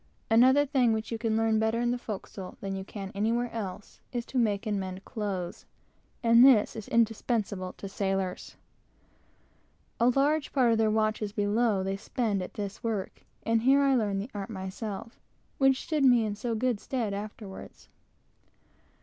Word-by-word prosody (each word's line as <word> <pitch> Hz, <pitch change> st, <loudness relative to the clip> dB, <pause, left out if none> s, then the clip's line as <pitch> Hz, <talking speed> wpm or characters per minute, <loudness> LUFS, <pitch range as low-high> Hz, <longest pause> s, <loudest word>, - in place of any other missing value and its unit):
Another 260 Hz, +5 st, +6 dB
thing 260 Hz, -5 st, +2 dB
which 220 Hz, +1 st, -3 dB
you 225 Hz, -, -3 dB
learn 225 Hz, -1 st, +2 dB
better 220 Hz, +1 st, +1 dB
in 240 Hz, 0 st, +1 dB
the 245 Hz, -, 0 dB
forecastle 195 Hz, -4 st, -7 dB
than 195 Hz, -1 st, -4 dB
you 190 Hz, -, -4 dB
can 195 Hz, -1 st, -7 dB
anywhere 230 Hz, +4 st, 0 dB
else, 205 Hz, -3 st, -6 dB
is, 240 Hz, -2 st, -3 dB
to 260 Hz, -, -2 dB
make 210 Hz, -2 st, +1 dB
and 210 Hz, -2 st, -1 dB
mend 185 Hz, 0 st, -6 dB
clothes, 200 Hz, -6 st, -4 dB, 0.6 s
and 230 Hz, +1 st, +7 dB
this 255 Hz, -6 st, +6 dB
is 220 Hz, -3 st, -7 dB
indispensable 220 Hz, -4 st, 0 dB
to 195 Hz, -, -8 dB
sailors. 195 Hz, -1 st, -3 dB, 1.4 s
A 235 Hz, +2 st, +5 dB
large 285 Hz, +4 st, +1 dB
part 255 Hz, -4 st, +4 dB
of 225 Hz, -, +2 dB
their 220 Hz, -1 st, +3 dB
watches 215 Hz, -1 st, 0 dB
below 205 Hz, 0 st, +1 dB
they 195 Hz, +1 st, -2 dB
spend 210 Hz, -1 st, -1 dB
at 180 Hz, -, -7 dB
this 200 Hz, -2 st, -5 dB
work, 215 Hz, -5 st, -3 dB, 0.2 s
and 225 Hz, 0 st, +2 dB
here 270 Hz, +4 st, +5 dB
I 275 Hz, -1 st, +4 dB
learned 205 Hz, -5 st, +1 dB
that 245 Hz, -, -10 dB
art 200 Hz, +2 st, -5 dB, 0.5 s
which 270 Hz, -1 st, +3 dB
stood 305 Hz, -3 st, 0 dB
me 245 Hz, -4 st, +5 dB
in 210 Hz, -, -2 dB
so 230 Hz, +2 st, -3 dB
good 240 Hz, -1 st, 0 dB
stead 230 Hz, -5 st, -2 dB
afterwards. 205 Hz, -1 st, -8 dB
220 Hz, 165 wpm, -28 LUFS, 200-240 Hz, 1.4 s, and